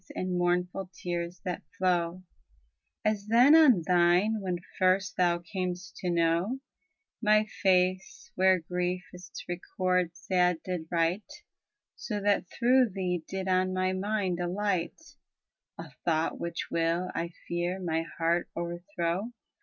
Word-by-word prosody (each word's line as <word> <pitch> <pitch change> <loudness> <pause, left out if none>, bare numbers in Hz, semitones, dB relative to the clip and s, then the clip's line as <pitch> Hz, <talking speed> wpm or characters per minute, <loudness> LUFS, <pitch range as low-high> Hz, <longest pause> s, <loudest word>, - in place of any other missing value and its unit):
iii, - - -1
10, 180 0 +1
14. 175 -2 -4
75 180 0 -5 0.2
CANZONIERE 175 0 +1 0.8
As 210 -1 0
then 245 +7 +7
on 260 - +6
thine 180 +5 +3
when 180 -2 -2 0.2
first 190 +1 +2
thou 175 -1 +3
cam'st 180 +1 -5
to 180 - -3
know 170 +7 +1 0.6
My 215 -1 +4 0.2
face, 185 0 +1
where 190 0 +4
grief 180 +1 -2
its 180 -3 -10
record 180 0 0
sad 180 -2 +1
did 180 -3 -4
write, 175 - 0 0.6
So 210 -3 -4
that 205 -3 +1
through 250 0 +3
thee 180 -3 -2
did 190 0 -4
on 185 0 +2
my 185 0 +1
mind 190 -2 -1
alight 185 - -1 0.8
A - - -9
thought 160 -1 0
which 170 0 -4
will, 170 +2 0
1 170 0 -2 0.2
fear, 175 +2 -2
my 165 -3 -1 0.2
heart 170 +1 +1
o'er 170 0 -4
throw. 175 +7 -1
180 Hz, 130 wpm, -29 LUFS, 175-190 Hz, 0.8 s, then